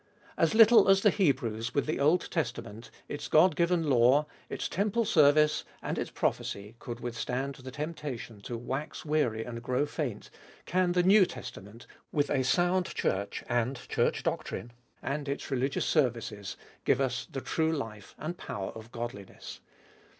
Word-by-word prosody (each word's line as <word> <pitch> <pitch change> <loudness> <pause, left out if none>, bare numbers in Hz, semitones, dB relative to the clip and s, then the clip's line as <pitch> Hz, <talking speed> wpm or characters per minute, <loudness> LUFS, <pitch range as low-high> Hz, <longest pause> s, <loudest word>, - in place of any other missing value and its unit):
As - - +2
little 225 -2 +8
as 195 0 +6
the 210 - +6
Hebrews 125 - 0
with 140 - +2
the 155 - -2
Old 155 +5 +3
Testament, 110 +3 -3 0.2
its 145 - -5
God 160 +1 +5
given 170 -2 +2
law, 130 +3 +5 0.2
its - - -3
temple 210 +4 0
service, 150 -2 +4 0.2
and - - -3
its - - -3
prophecy, 100 +2 -2
could 120 0 -7
withstand 125 +3 -3
the 130 -2 -10
temptation 145 -7 -6
to 120 +3 -5
"wax 135 +8 -5
weary 145 -8 +1
and 115 -1 -6
grow 125 +4 0
faint," 145 -7 -4 0.3
can 180 0 +1
the 180 0 +3
New 190 0 +6
Testament, 105 +5 -9 0.3
with 145 -1 0
a 135 -3 +2
sound 175 +6 +2
Church 100 +1 -2
and 120 +2 0
Church - - +1
doctrine, 120 - -3 0.3
and 140 +1 -3
its 140 0 -4
religious 135 +1 0
services, 115 - 0 0.3
give - - +3
us 125 -2 -1
the 135 - -3
true 160 +5 0
life 115 -9 -5
and 160 +3 -4
power 95 -1 -5
of 110 +1 -11
godliness. 115 -5 -7
135 Hz, 155 wpm, -30 LUFS, 120-160 Hz, 0.3 s, little